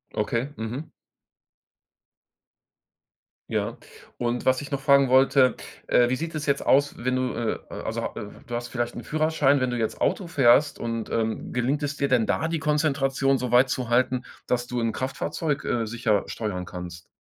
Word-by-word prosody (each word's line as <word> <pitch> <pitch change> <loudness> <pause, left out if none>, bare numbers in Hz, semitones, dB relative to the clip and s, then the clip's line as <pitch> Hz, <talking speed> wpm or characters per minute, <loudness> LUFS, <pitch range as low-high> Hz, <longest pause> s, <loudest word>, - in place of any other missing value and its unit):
Okay. 115 +5 -1
Mhm. 125 +8 -5 2.6
Ja, - - -1 0.4
und 120 0 -1
was 130 +1 +3
ich 145 - -8
noch 140 - -2
fragen 140 -1 +4
wollte, 130 -1 +5 0.3
äh: 120 - +4
Wie 125 - +1
sieht 165 +4 -5
es 155 -1 -3
jetzt 140 -1 +1
aus, 145 +2 +3
wenn 130 +1 0
du, 130 -1 -1
äh 115 -2 -1
äh - - -9
also - - -3
ha - - -3
äh, - - -6 0.2
du 120 - -8
hast 120 0 -3
vielleicht 120 -1 -3
'n 120 - -6
Führerschein. 155 -3 +2
Wenn 130 -1 0
du 120 - -2
jetzt 110 -2 -2
Auto 185 - 0
fährst 145 -1 +4
und 115 -1 -3
ähm, 110 -1 -2
gelingt 130 +4 0
es 145 0 -3
dir 140 - +1
denn 125 -4 +2
da, 160 - 0
die 165 -1 -1
Konzentration 135 -3 +1
so 125 -2 -3
weit 125 +2 +5
zu 125 -2 -2
halten, 125 +1 +2 0.2
dass 120 -1 -1
du 125 -1 -2
'n 115 - +1
Kraftfahrzeug, 140 +5 -3
äh, 115 -2 0
sicher 110 -3 0
steuern 100 -5 -4
kannst? 85 -1 -8
130 Hz, 185 wpm, -25 LUFS, 120-140 Hz, 2.6 s, wollte